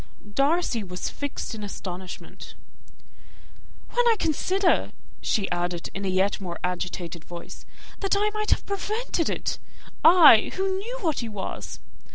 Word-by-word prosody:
Darcy 275 Hz, -3 st, +2 dB
was 180 Hz, -1 st, -4 dB
fixed 285 Hz, -3 st, -4 dB
in 220 Hz, -, -6 dB
astonishment. 185 Hz, -2 st, -7 dB, 1.4 s
"When 485 Hz, -, +3 dB
I 460 Hz, -, +6 dB
consider," 370 Hz, +3 st, +1 dB, 0.3 s
she 205 Hz, -4 st, +1 dB
added, 175 Hz, -1 st, -2 dB
in 195 Hz, 0 st, -4 dB
a -, -, 0 dB
yet 190 Hz, +2 st, +1 dB
more 175 Hz, -3 st, -5 dB
agitated 180 Hz, -2 st, -3 dB
voice, 175 Hz, 0 st, -10 dB, 0.3 s
"that 395 Hz, 0 st, +1 dB
I 420 Hz, +1 st, +2 dB
might 425 Hz, 0 st, -2 dB
have -, -, +2 dB
prevented 405 Hz, -3 st, -1 dB
it! -, -, -2 dB, 0.4 s
I 320 Hz, -9 st, +8 dB
who 380 Hz, 0 st, 0 dB
knew 475 Hz, +5 st, -5 dB
what 320 Hz, -6 st, 0 dB
he 235 Hz, -, -3 dB
was. 205 Hz, -3 st, -6 dB
240 Hz, 140 wpm, -26 LUFS, -, 1.4 s, I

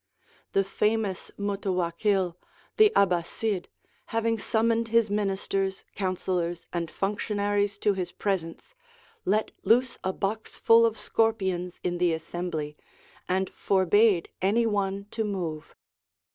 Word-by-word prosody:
The 195 Hz, -, +4 dB
famous 210 Hz, 0 st, -1 dB
Mutawakkil, 195 Hz, -2 st, 0 dB, 0.4 s
the 430 Hz, -1 st, +7 dB
'Abbasid, 185 Hz, +1 st, +1 dB, 0.4 s
having 225 Hz, 0 st, +1 dB
summoned 230 Hz, +2 st, +1 dB
his 225 Hz, -2 st, +3 dB
ministers, 195 Hz, -1 st, -1 dB
councillors, 180 Hz, -3 st, -2 dB
and 170 Hz, -2 st, -2 dB
functionaries 205 Hz, +1 st, -1 dB
to 205 Hz, 0 st, +2 dB
his 180 Hz, -2 st, -3 dB
presence, 195 Hz, -, -3 dB, 0.5 s
let 210 Hz, +3 st, +1 dB
loose 245 Hz, +2 st, +2 dB
a 190 Hz, -, 0 dB
box 205 Hz, +3 st, -3 dB
full 230 Hz, 0 st, +6 dB
of 225 Hz, -1 st, -3 dB
scorpions 190 Hz, -6 st, 0 dB
in 175 Hz, -1 st, -1 dB
the 175 Hz, -2 st, +3 dB
assembly, 160 Hz, -2 st, -4 dB, 0.5 s
and 190 Hz, +1 st, +1 dB
forbade 195 Hz, 0 st, +3 dB
any 215 Hz, +5 st, +3 dB
one 200 Hz, -2 st, -1 dB
to 225 Hz, -, -1 dB
move. 175 Hz, -7 st, -4 dB
195 Hz, 115 wpm, -27 LUFS, 180-215 Hz, 0.5 s, the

